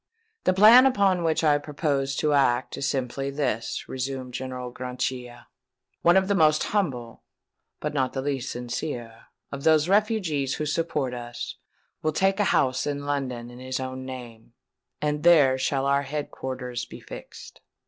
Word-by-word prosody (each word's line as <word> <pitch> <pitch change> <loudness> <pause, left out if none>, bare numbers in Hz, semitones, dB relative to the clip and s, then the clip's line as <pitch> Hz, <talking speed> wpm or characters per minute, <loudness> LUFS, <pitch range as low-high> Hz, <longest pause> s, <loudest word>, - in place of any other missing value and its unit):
"The 185 - +4
plan 230 +7 +9
upon 195 -8 +2
which 160 0 +1
I 150 -2 +4
propose 140 -2 -1
to 150 +1 +1
act 130 -3 +2
is 140 - -1
simply 135 0 -2
this," 135 -5 -2
resumed 130 -1 -4
General 125 0 -5
Grachia:—"one 125 +5 -3
of 190 0 +3
the 200 - +2
most 155 -5 +4
humble, 130 - -2 0.6
but - - -3
not 130 -3 0
the 135 - -2
least 135 -2 -2
sincere, 120 -1 -5 0.3
of 140 0 -6
those 155 0 +4
refugees 190 - +1
who 155 - -3
support 150 -4 -1
us, 120 -1 -6 0.4
will 155 0 0
take 195 +4 +2
a 205 - +3
house 130 -7 +1
in 145 -1 -3
London 130 -4 -3
in 120 - -12
his 130 0 -4
own 130 0 -5
name; 120 -3 -9 0.5
and 150 0 0
there 150 -6 +5
shall 135 +1 0
our 140 0 +3
head 145 +1 -4
quarters 125 -2 -5
be - - -11
fixed. - - -11
135 Hz, 160 wpm, -26 LUFS, 125-155 Hz, 0.6 s, plan